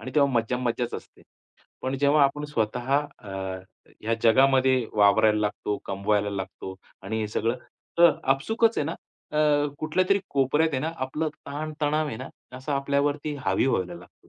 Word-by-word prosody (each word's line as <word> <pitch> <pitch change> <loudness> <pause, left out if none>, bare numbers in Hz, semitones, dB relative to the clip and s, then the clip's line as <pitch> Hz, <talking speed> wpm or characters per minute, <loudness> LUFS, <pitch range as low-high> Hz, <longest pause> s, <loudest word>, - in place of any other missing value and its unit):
आणि 130 - -7
तेव्हा 140 -2 +4
मज्जा-मज्जाच 120 +1 -1
असते. - - -10 0.6
पण 130 +1 -2
जेव्हा 145 +2 +4
आपण 150 +2 0
स्वतः 125 -2 -2 0.3
अ, 105 -5 -11 0.7
या 115 +1 +1
जगामध्ये 130 +3 +5 0.2
वावरायला 105 +1 +4
लागतो, 105 0 -2
कमवायला 100 +1 0
लागतो 95 -1 -6 0.3
आणि 110 +3 -3
हे 105 - -2
सगळं 115 +3 +1 0.4
तर 170 0 +8 0.2
आपसूकच 225 +11 +1
आहे - - +1
ना, 165 - -3 0.4
अ, 150 -1 +3
कुठल्यातरी 185 +5 +2
कोपऱ्यात 145 +4 +2
आहे 135 - 0
ना, 160 +3 -2
आपला 150 +4 -2
ताण 150 +1 -7
तणाव 150 +1 +1
आहे 140 - -4
ना, - - -7 0.3
असं 130 +3 -4
आपल्यावरती 145 +2 0
हावी - - +2
व्हायला 90 -9 0
लागतो. 90 +1 -16
135 Hz, 155 wpm, -26 LUFS, 110-150 Hz, 0.7 s, तर